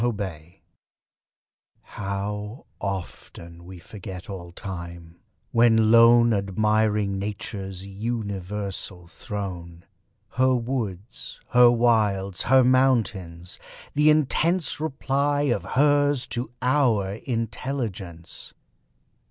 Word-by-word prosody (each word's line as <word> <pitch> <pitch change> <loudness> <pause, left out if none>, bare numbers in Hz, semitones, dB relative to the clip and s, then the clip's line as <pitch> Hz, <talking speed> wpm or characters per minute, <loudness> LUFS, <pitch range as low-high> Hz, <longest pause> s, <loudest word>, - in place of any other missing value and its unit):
STANZAS 95 -9 -3 1.3
How 105 +3 -5
often 85 -3 -7
we 95 0 -10
forget 95 +1 -9
all 85 -3 -8
time, 85 -2 -8 0.3
when 110 -2 +4
lone 115 0 +7
Admiring 105 0 +1
Nature's 95 -2 -5
universal 100 -3 -4
throne; 85 -2 -7 0.4
Her 130 0 +2
woods 115 -5 -4
her 125 -1 +7
wilds 105 -6 +2
her 130 +1 +5
mountains 110 -10 +1 0.3
the 150 +1 +4
intense 155 +3 +2
Reply 145 -1 0
of 130 -5 0
HERS 145 -1 +2
to 120 0 -3
OUR 115 -7 +2
intelligence! 115 -8 -5
105 Hz, 85 wpm, -25 LUFS, 95-125 Hz, 1.3 s, lone